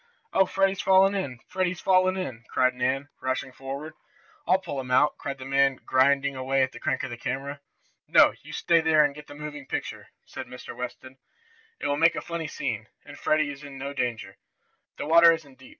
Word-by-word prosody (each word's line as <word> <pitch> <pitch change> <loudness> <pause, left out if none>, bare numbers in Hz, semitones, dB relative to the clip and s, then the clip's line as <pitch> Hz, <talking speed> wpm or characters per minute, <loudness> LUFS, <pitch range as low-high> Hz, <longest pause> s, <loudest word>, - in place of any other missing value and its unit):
"Oh, 190 - +4
Freddie's 195 0 +1
fallen 195 +1 +5
in! 165 -11 -3
Freddie's 185 -1 -1
fallen 185 0 +3
in!" 130 -11 -5
cried 130 0 +2
Nan, 130 +3 -1
rushing 130 +1 -2
forward. 140 +4 -7 0.5
"I'll 185 - +5
pull 170 -7 -5
him 130 -1 -6
out!" 140 +4 +4
cried 140 -1 -4
the 130 - -9
man 135 0 +3
grinding 140 +1 +3
away 130 +1 +1
at 130 - -1
the - - -11
crank 140 -4 -1
of 130 - -4
the 120 - -6
camera. 140 +4 -4 0.5
"No, - - +6
you - - -12
stay 170 -1 +2
there 160 -1 +5
and 145 - -1
get 150 +1 -12
the 145 - -11
moving 150 -2 -8
picture," - - -5 0.2
said - - -8
Mr. 125 -1 -9
Watson. 125 +1 -7 0.6
"It - - -5
will 145 - +1
make 165 +2 +4
a - - -3
funny 170 -2 -4
scene, 115 -7 -4 0.2
and 145 0 -11
Freddie 155 -2 +1
is 140 0 -10
in 140 -1 -9
no 140 +1 -5
danger. 120 -4 -3 0.6
The - - -4
water 170 +2 +7
isn't 145 -5 -8
deep! 130 - -14
140 Hz, 205 wpm, -26 LUFS, 130-160 Hz, 0.6 s, water